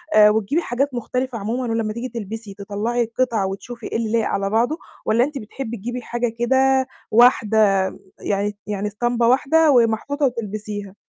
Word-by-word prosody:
آآ، 210 0 +8
وتجيبي 220 - +1
حاجات 270 0 -1
مختلفة 250 0 -3
عمومًا 230 +5 -2
ولمّا 220 -2 -1
تيجي 245 +2 -5
تلبسي، 220 -2 -6
تطلّعي 210 +4 -2
القطعة 230 -3 0
وتشوفي 235 +4 -7
إيه - - -2
اللي 225 -2 -2
لايق 230 -2 +2
على 195 0 -1
بعضه، 240 +9 +1 0.3
والّا 230 +3 +3
أنتِ 285 0 -3
بتحبّي 235 +1 -6
تجيبي 245 +5 -5
حاجة 240 0 -2
كده 265 +1 +3 0.2
واحدة 225 -2 +5 0.6
يعني 205 0 -1
يعني 205 0 -2
إسطمبة 235 +3 0
واحدة 295 +5 +4
ومحطوطة 245 +4 +2
وتلبسيها؟ 210 -4 -4
230 Hz, 155 wpm, -21 LUFS, 210-250 Hz, 0.6 s, آآ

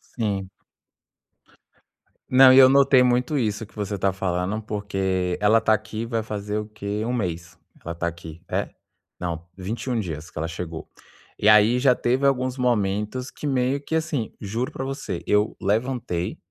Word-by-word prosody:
Sim. 100 -5 -2 1.8
Não, 130 0 +8
e 130 - +6
eu 130 - +10
notei 135 -1 +5
muito 125 +4 +1
isso 110 -2 -1
que 105 - -23
você 105 -1 -3
tá 95 +1 +1
falando, 95 +2 -2
porque 95 -4 -2
ela 110 +2 +4
tá 110 - +2
aqui 110 +1 -3
vai 115 -1 -1
fazer 105 -1 -4
o 105 - -3
quê? 105 0 -4
1 120 - -1
mês. 85 -6 -4 0.3
Ela 85 +1 -4
tá 85 - -3
aqui 85 -1 -6
é? - - -1 0.5
Não, 85 -1 -5
21 115 +6 -3
dias 80 -6 -4
que - - -15
ela 80 - -2
chegou. 80 -1 -7 0.5
E 105 - +1
aí, 110 +3 +6
já 125 -1 +4
teve 130 +4 0
alguns 130 -1 0
momentos 115 +1 -1
que 150 - -6
meio 135 0 +1
que, 160 - -3
assim 155 -8 -2
juro 115 +8 -3
pra - - -4
você, 135 - -5
eu 105 +1 +2
levantei, 110 -3 -1
105 Hz, 165 wpm, -24 LUFS, 95-125 Hz, 1.8 s, eu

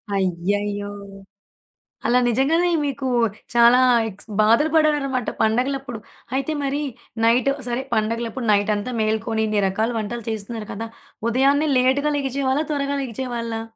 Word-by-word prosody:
అయ్యయ్యో! 200 +2 -1 1.2
అలా 250 +1 +4
నిజంగానే 285 +9 +2 0.2
మీకు 275 -1 -3 0.5
చాలా 240 +1 +6 0.3
ఎక్స్ 200 +1 -13
బాధలు 230 +8 +4
పడారన్నమాట 285 -5 +2
పండగలప్పుడు. 250 +1 0 0.4
అయితే 275 +3 -1
మరి 280 +1 -1 0.4
నైట్ 245 +4 +3 0.2
సరే, 240 +1 -1
పండగలప్పుడు 230 +2 -1
నైట్ 205 +1 +2
అంతా 210 +5 -4
మేల్కొని, 220 0 0
ఇన్ని 210 -1 +1
రకాల 215 +4 0
వంటలు 230 +2 -5
చేస్తున్నారు 220 0 -5
కదా! 225 +3 -5 0.4
ఉదయాన్నే 280 +5 +3
లేట్‌గా 265 +4 +2
లెగిచేవాళ్ళ? 270 0 0
త్వరగా 280 -1 -1
లెగిచేవాళ్ళా? 235 -2 -4
240 Hz, 120 wpm, -22 LUFS, 220-275 Hz, 1.2 s, చాలా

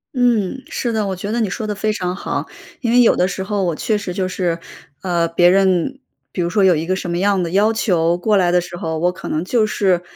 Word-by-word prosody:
嗯， 245 -1 +1
是 240 - -2
的， 215 -2 -1
我 190 - -2
觉 200 +3 -5
得 235 - 0
你 215 -4 0
说 220 +4 -4
得 210 - -2
非 215 +1 -1
常 180 -3 -2
好。 - - -3 0.3
因 235 - 0
为 245 +1 +6
有 235 - +5
的 180 - +1
时 190 +1 -4
候 200 0 -1
我 175 -2 0
确 215 +6 0
实 205 -3 -5
就 185 0 -1
是， 175 -2 -2 0.4
呃， 175 -2 +1
别 175 +1 +4
人 195 +7 +2 0.3
比 - - -2
如 170 - 0
说 200 0 +2
有 180 -2 +5
一 160 +1 -2
个 185 +2 -1
什 185 - -5
么 170 - -1
样 200 0 +2
的 170 -2 -3
要 205 +4 +3
求 175 -6 +1
过 210 +4 +1
来 180 -3 +3
的 180 - +4
时 175 0 -7
候， 160 -2 -3
我 175 - +2
可 - - -8
能 155 +3 -2
就 225 +2 +2
是 190 -4 +1
190 Hz, 285 characters per minute, -19 LUFS, 175-215 Hz, 0.4 s, 为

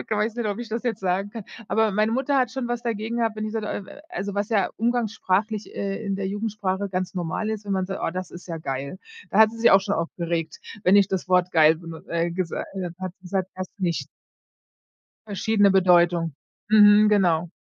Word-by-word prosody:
ich - - -11
weiß 215 +1 0
nicht, 235 -3 -1
ob 205 +1 -2
ich 240 -2 -6
das 225 +1 -3
jetzt 235 -4 -2
sagen 190 +2 -1
kann. 225 -2 -8 0.2
Aber 220 -1 +2
meine 215 +3 +1
Mutter 270 +3 +1
hat 250 -2 +1
schon 255 -2 -4
was 240 0 -2
dagegen 230 0 -3
gehabt, 225 -2 0
wenn 215 - -3
ich 215 - -5
so, 225 - -1
d 210 - -5
äh, 200 - -4
w - - -15 0.2
also, 200 +2 -4
was 205 +1 -1
ja 205 -5 +1
umgangssprachlich, 220 -3 -1
äh, 200 +2 -3
in 195 -1 -1
der 195 -1 -3
Jugendsprache 205 -2 -2
ganz 185 0 -3
normal 180 +4 -2
ist, 215 -1 -4
wenn 200 - -3
man 190 -1 0
sagt: 195 - -5
„Oh, - - 0
das 185 -1 -5
ist 175 - -11
ja 165 - -4
geil.“ 140 +3 -5 0.3
Da 200 - +1
hat 220 -1 +7
sie 230 - -10
sich 230 - +5
auch 195 - +7
schon 200 +1 -1
aufgeregt, 165 -1 -3 0.3
wenn 185 +3 +6
ich 200 -2 +5
das 185 -1 -3
Wort 180 -1 +3
geil, 160 0 +6
benu 165 -1 -9
äh, 170 0 0
gesa 175 -1 -3
äh, 180 -3 -3
hat 185 -1 -5
gesagt 190 0 -2
hast 185 0 -6
du 190 - -9
nicht. 170 -2 -1 1.2
Verschiedene 205 0 +2
Bedeutung. 175 -4 +3 0.3
Mhm, 210 0 +7
genau. 175 -5 +2
195 Hz, 230 wpm, -24 LUFS, 180-215 Hz, 1.2 s, hat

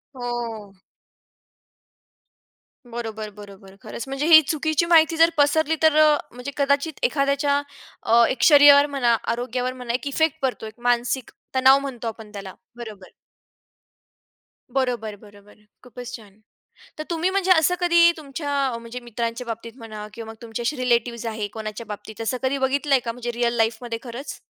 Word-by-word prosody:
हो. 235 -5 -5 2.2
बरोबर, 220 -2 -5
बरोबर. 200 -1 -14
खरंच, - - -7
म्हणजे 275 +2 -3
ही 320 -1 +9
चुकीची 315 +1 0
माहिती 330 -1 +4
जर 330 +1 +6
पसरली 315 +2 +3
तर 315 -1 +5
अ, 305 -1 +5
म्हणजे 250 +3 -7
कदाचित 280 +2 +1
एखाद्याच्या 280 0 +1 0.4
अ, 235 +1 +5
एक 260 - -3
शरीरावर 285 -1 +8
म्हणा, 240 -3 +3 0.2
आरोग्यावर 250 +1 -3
म्हणा 250 -2 -5
एक 255 +4 -3
इफेक्ट 320 +2 0
पडतो, 260 -4 -2
एक 220 +2 -11
मानसिक 245 +1 0 0.2
तणाव 265 +1 +6
म्हणतो 260 -4 -6
आपण 220 -1 -8
त्याला. 195 -2 -8 0.2
बरोबर. 215 -5 -10 1.6
बरोबर, 240 -5 -2
बरोबर, 205 -1 -17 0.3
खूपच 245 0 -10
छान. 210 -3 -15 0.6
तर 310 - -4
तुम्ही 340 +2 0
म्हणजे 380 -1 0
असं 345 0 +5
कधी 340 -1 +5
तुमच्या 290 0 -6 0.3
म्हणजे 235 +2 -8
मित्रांच्या 235 +1 -4
बाबतीत 230 0 -6
म्हणा 215 -4 -8
किंवा 225 -1 -8
मग - - -16
तुमचे 230 0 -6
असे 265 +6 -1
रिलेटिव्हज 235 -2 0
आहे, 215 -2 -3
कोणाच्या 215 +1 -7
बाबतीत 210 +1 -9
असं 225 +3 -1
कधी 265 +1 0
बघितलंय 275 +1 +2
का 230 - -2
म्हणजे 240 0 -5
रिअल 235 0 0
लाईफमध्ये 230 +1 -1
खरंच? 245 +3 -8
245 Hz, 150 wpm, -23 LUFS, 225-285 Hz, 2.2 s, ही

